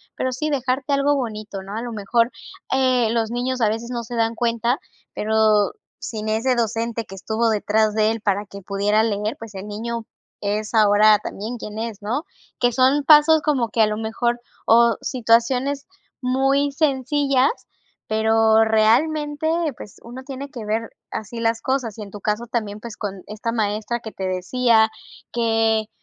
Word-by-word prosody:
pero 260 0 -1
sí 305 +4 -2
dejarte 265 0 -1
algo 280 +1 +3
bonito, 215 -6 -4
¿no?, 200 +2 -7
a 230 - -2
lo 240 -1 -5
mejor, 230 +3 +1 0.4
eh, 255 -3 +3
los 230 -1 0
niños 250 +1 -2
a 215 - +4
veces 225 +2 -4
no 240 -1 -3
se 240 +2 -7
dan 230 0 +1
cuenta, 235 +2 0 0.4
pero 215 -1 +3 0.3
sin 215 -2 -5
ese 230 +4 +1
docente 230 0 -1
que 195 - -10
estuvo 220 +4 0
detrás 215 0 +1
de 215 0 +3
él 225 -1 -4
para 205 0 0
que 200 0 -11
pudiera 200 +2 +1
leer, 210 0 -1
pues 220 -3 -10
el 190 - -6
niño 230 +2 -4 0.3
es 210 +2 -2
ahora 210 0 +6
también 220 +4 -6
quien 215 -1 -7
es, 225 -2 -5
¿no?, 235 +8 -1 0.4
que 245 0 +3
son 265 +4 +3
pasos 305 +1 +6
como 270 -6 +1
que 225 - +1
a 215 - +5
lo 210 0 -2
mejor 235 +2 -1 0.3
o 235 0 +5
situaciones 255 +3 +1 0.4
muy 270 +3 +2
sencillas, 275 -2 +2 0.6
pero 220 0 +4
realmente, 295 +8 +2 0.3
pues, 205 - -11
uno 250 +3 -9
tiene 275 +1 -7
que 245 -6 -8
ver 220 +2 -2 0.2
así 225 +2 -5
las 225 0 +1
cosas, 255 -5 -2
y 215 - -6
en 200 - -11
tu 205 - -9
caso 215 +3 -1
también, 215 -3 -3
pues, 230 -1 -8
con 195 -3 -5
esta 215 +2 -4
maestra 220 +1 -1
que 220 -1 -8
te 190 - -5
decía 220 +5 +2 0.4
que 225 -2 +1
230 Hz, 175 wpm, -22 LUFS, 215-255 Hz, 0.6 s, ahora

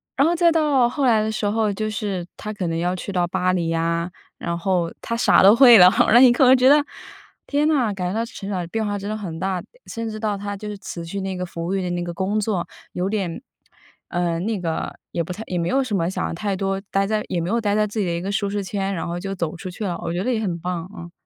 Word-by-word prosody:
然 275 - +4
后 345 - +2
再 340 0 +4
到 295 -7 +3
后 275 +2 -1
来 225 -4 +4
的 220 - -1
时 215 - -3
候， 215 0 +1
就 215 +2 -2
是 200 -4 -3
她 215 - -5
可 190 -4 -3
能 165 0 -1
要 175 +2 0
去 185 - -6
到 180 -2 +1
巴 185 +1 0
黎 170 -2 0
呀， 165 +1 0 0.3
然 170 0 -3
后 175 -2 0
她 230 - -3
啥 235 - +5
都 200 +3 +8
会 240 -2 +9
了。 180 -2 +9 0.2
然 - - +2
后 - - +9
你 250 -1 +8
可 250 - +3
能 260 +1 +7
觉 255 +1 +4
得 295 +1 +6 0.6
天 295 +1 +1
哪， 255 -9 +2
感 180 -2 -3
觉 - - -3
到 230 - 0
成 200 -3 -8
长 180 -3 -2
变 225 +4 -2
化 205 -1 -2
真 200 - -6
的 215 - -2
很 175 -6 -6
大。 190 0 -1 0.3
甚 230 -1 -4
至 215 - -6
到 210 -2 -1
她 205 0 -5
就 210 +1 -7
是 205 - -6
辞 170 -4 -7
去 195 +4 -4
那 190 -1 -3
个 180 - -3
服 170 -1 -6
务 185 - -2
员 190 - -1
的 180 - -2
那 175 0 -2
个 175 0 -5
工 190 +5 -1
作 200 -4 -1 0.3
有 185 +2 -1
点 195 -3 -2 0.7
呃， 175 -1 -1
那 210 +1 -2
个 165 -2 -3 0.2
也 170 - -1
不 175 - -7
太， 215 +5 -7
也 180 - -2
没 170 0 -1
有 270 +5 +2
什 225 -5 -2
么 170 0 0
想 185 - -3
太 200 +2 -2
多 195 0 -1
待 195 0 +1
在 215 0 0
也 180 - -1
没 170 - -3
有 235 +2 +1
待 205 -2 0
在 215 0 +2
自 215 +1 -4
己 200 - +1
的 170 - -1
一 170 - -3
个 195 +2 -3
舒 200 -1 -1
适 205 0 -2
圈， 195 0 -2
然 165 - -3
后 175 +1 -3
就 195 +2 -4
走 170 -3 -3
出 185 - -7
去 210 +4 -5
了， 175 -3 -2
我 170 - -2
觉 180 +2 -2
得 250 - 0
也 225 - 0
很 175 -5 -2
棒， 180 0 -4
嗯。 170 0 -9
195 Hz, 310 characters per minute, -22 LUFS, 175-215 Hz, 0.7 s, 会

